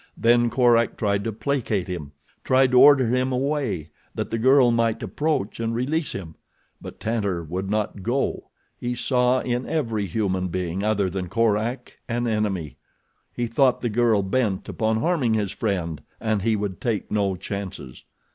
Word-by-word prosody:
Then 120 +1 +4
Korak 120 -2 +3
tried 100 -2 0
to 115 - -1
placate 110 -4 -1
him. 80 -6 -6 0.3
Tried 130 0 +3
to 125 - +6
order 140 -2 +7
him 130 +3 +1
away, 125 - -1 0.2
that - - -3
the 115 - -1
girl 130 +1 +5
might 115 -1 +1
approach 150 -11 -2
and 115 0 -1
release 145 +6 -1
him; 85 -5 -7 0.5
but - - -10
Tantor 100 -6 -1
would 90 +4 -4
not 105 -1 -2
go. 120 +7 -2 0.3
He 120 0 -2
saw 125 +1 +2
in 125 0 -2
every 115 -10 -1
human 95 -1 -1
being 90 +1 -3
other 105 -2 +1
than 90 -1 -4
Korak 115 +4 -1
an 120 +1 -1
enemy. 105 -9 -1 0.5
He 120 - -2
thought 125 +2 +2
the 120 - -1
girl 115 -2 +2
bent 100 -1 -1
upon 110 0 0
harming 135 -8 +1
his 105 -3 -1
friend 90 -8 -2 0.2
and 110 -2 0
he 110 +2 +1
would 100 -3 -4
take 110 -6 -2
no 100 -2 +1
chances. 95 -8 -7
110 Hz, 165 wpm, -24 LUFS, 100-125 Hz, 0.5 s, order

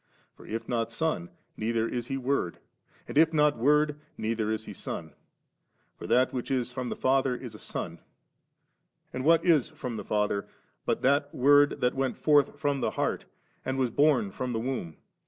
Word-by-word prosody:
For - - -15
if 115 +1 -4
not 115 -2 -1
Son, 115 - -2 0.3
neither 115 +1 0
is 120 -1 -3
He 135 - -2
Word; 130 -9 -1 0.5
and - - -7
if 160 0 +5
not 150 -4 +3
Word, 150 +3 +3 0.2
neither 110 -1 -1
is 110 0 -2
He - - -7
Son. 80 -2 -6 0.8
For - - -8
that 130 +1 +3
which 125 +1 -3
b 130 -2 +1
from 125 0 -5
the - - -3
&ther 130 -1 +2
is 125 -3 -8
a 105 - -11
son; 85 0 -5 1.1
and 130 - -3
what 165 +3 +4
is 160 -7 +4
from 130 -7 -6
the - - -5
Father, 105 -1 0 0.4
but - - 0
that 145 +2 +3
Word 145 +2 +5
that 125 0 +2
went 135 -1 -1
forth 145 -2 +3
from 145 -3 0
the - - +1
heart, - - -2 0.4
and 130 0 -2
was 130 -3 +1
bom 140 -7 +3
from 125 +4 -3
the 115 - -1
womb 115 - -4
130 Hz, 185 wpm, -28 LUFS, 115-145 Hz, 1.1 s, if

